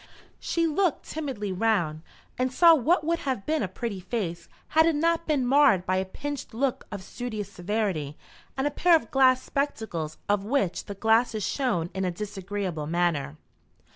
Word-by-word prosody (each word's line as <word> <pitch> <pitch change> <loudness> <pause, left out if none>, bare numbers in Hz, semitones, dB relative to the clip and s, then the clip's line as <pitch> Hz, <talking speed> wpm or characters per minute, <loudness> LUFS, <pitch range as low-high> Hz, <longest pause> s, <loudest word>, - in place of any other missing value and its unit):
She 335 -1 0
looked 330 +1 +1
timidly 265 -10 -4
round, 180 -6 0 0.3
and 255 0 0
saw 335 +5 +7
what 315 +3 +3
would 335 +2 0
have 260 -8 -3
been 310 -1 0
a - - 0
pretty 200 +2 -5
face, 180 -4 -4 0.2
had 320 +1 +4
it 330 - +2
not 335 +2 +1
been 290 -5 +1
marred 245 -9 +4
by 185 +1 +1
a 190 - 0
pinched 285 +5 -6
look 260 +1 -1
of 200 -2 -6
studious 215 -3 -5
severity 180 -7 -2 0.4
and 265 - 0
a 290 - +1
pair 345 +2 +4
of 230 -9 -1
glass 260 -1 +4
spectacles 220 - -3
of 205 -1 +1
which 210 -5 0
the 200 - -7
glasses 220 +1 +2
shone 210 - -1
in 190 0 -2
a 185 - +1
disagreeable 195 -4 -4
manner. 160 -4 0
220 Hz, 170 wpm, -26 LUFS, 185-280 Hz, 0.4 s, saw